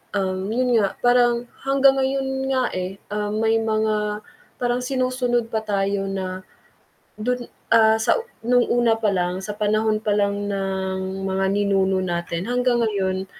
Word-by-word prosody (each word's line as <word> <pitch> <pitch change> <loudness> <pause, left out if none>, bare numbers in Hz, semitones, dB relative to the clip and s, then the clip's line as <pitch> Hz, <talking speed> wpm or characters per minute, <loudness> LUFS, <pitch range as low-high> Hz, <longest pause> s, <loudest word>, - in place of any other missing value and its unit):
um, 190 -1 -1
yun 245 +1 +2
nga 200 -2 0
parang 245 -1 +4 0.2
hanggang 270 0 +4
ngayon 270 0 0 0.3
nga, 260 - +2
eh, 185 +1 -4 0.2
ah, 210 0 -2
may 225 +1 +2
mga 215 -1 -1 0.3
parang 245 0 0
sinusunod 250 -2 -1
pa 220 - 0
tayo 200 -2 -1
na 185 -1 -4 0.8
dun, 245 +2 -2 0.3
ah, 220 -1 +6
sa 220 - +2 0.3
nung 245 +1 +4
una 240 -1 +3
pa 215 - +2
lang 180 0 -1
sa 205 +2 -5
panahon 215 0 +1
pa 210 - +1
lang 200 0 0
ng 190 -1 -3
mga 190 0 0
ninuno 195 -1 +2
natin. 170 0 -3
Hanggang 245 -1 +1
ngayon, 190 -3 -1
210 Hz, 150 wpm, -22 LUFS, 195-240 Hz, 0.8 s, ah